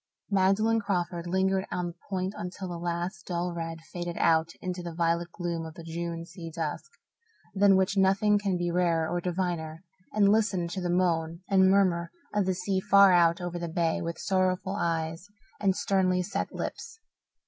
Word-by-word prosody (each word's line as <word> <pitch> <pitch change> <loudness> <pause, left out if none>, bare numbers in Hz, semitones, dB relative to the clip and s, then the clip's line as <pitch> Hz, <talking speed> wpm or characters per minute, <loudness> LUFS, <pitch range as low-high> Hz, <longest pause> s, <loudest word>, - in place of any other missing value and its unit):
Magdalen 200 +4 +3
Crawford 175 -4 -2
lingered 190 +1 +1
on 180 - -1
the 175 - -5 0.2
point 190 0 -2
until 180 +2 -6
the 175 -1 -5
last 175 +2 -3
dull 175 0 -2
red 165 -1 -5
faded 175 -1 -4
out 160 0 +3
into 180 -1 -4
the 170 -2 -7
violet 170 0 0
gloom 170 -2 -3
of 160 -1 -8
the 170 - -9
June 165 0 -4
sea 170 -1 -9
dusk, 160 - -4 0.6
than 200 -1 +5
which 190 +1 +1
nothing 195 +2 +4
can 195 -3 0
be 175 0 -1
rarer 170 -2 +1
or 175 +1 -2
diviner, 175 -2 -3 0.3
and 200 -1 +4
listened 195 -6 +1
to 190 - -3
the 175 - -2
moan 170 -2 0
and 190 -1 +5
murmur 185 -3 +3 0.2
of 205 -2 +1
the 185 - +1
sea 190 +1 -1
far 200 0 +6
out 170 0 +4
over 175 0 -4
the 170 -1 -4
bay 165 0 0
with 170 0 -4
sorrowful 185 0 0
eyes 165 -1 -2 0.3
and 195 -2 +2
sternly 185 -2 +1
set 180 - -3
lips. 465 -1 -6
180 Hz, 180 wpm, -28 LUFS, 170-190 Hz, 0.6 s, far